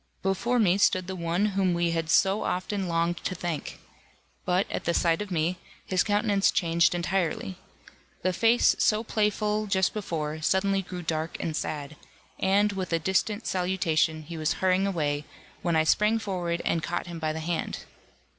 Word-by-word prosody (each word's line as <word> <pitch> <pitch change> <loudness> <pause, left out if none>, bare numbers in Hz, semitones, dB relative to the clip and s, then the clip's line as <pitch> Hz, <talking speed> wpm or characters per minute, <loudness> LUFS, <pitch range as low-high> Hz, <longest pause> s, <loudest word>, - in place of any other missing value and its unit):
Before 230 +6 +1
me 200 -4 +3
stood 185 -2 +3
the 190 +1 -5
one 170 +3 0
whom 190 -2 +1
we 170 0 +1
had 165 -1 -2
so 195 +5 +3
often 190 +1 -2
longed 170 0 0
to 185 - -4
thank. 170 -3 -4 0.7
But 180 +2 +2
at 170 - -1
sight 165 +2 +2
of 210 - -5
me, 175 0 -1 0.3
his 185 -1 +1
countenance 205 -1 +2
changed 170 -2 +2
entirely. 180 +1 -1 0.7
The 185 - +1
face, 230 +6 +4
so 215 +1 +3
playful 210 -1 0
just 190 -2 +1
before, 155 -7 -3
suddenly 195 +4 +2
grew 180 -1 -7
dark 160 0 -2
and 160 - -3
sad, 150 -1 -4 0.4
and, 200 +2 +3
with 190 -2 -4
a 165 - +3
distant 190 +6 0
salutation, 175 -4 0
he 165 +2 -8
was 155 +1 +1
hurrying 190 +2 +1
away, 150 -6 -1 0.4
when 170 -2 0
I 160 - +4
sprang 210 +7 +3
forward 180 -5 -3
and 165 - +1
caught 175 +2 -3
him 170 -2 -7
by 155 -1 -1
the 160 - -4
hand. 165 +1 -3
180 Hz, 170 wpm, -27 LUFS, 165-195 Hz, 0.7 s, face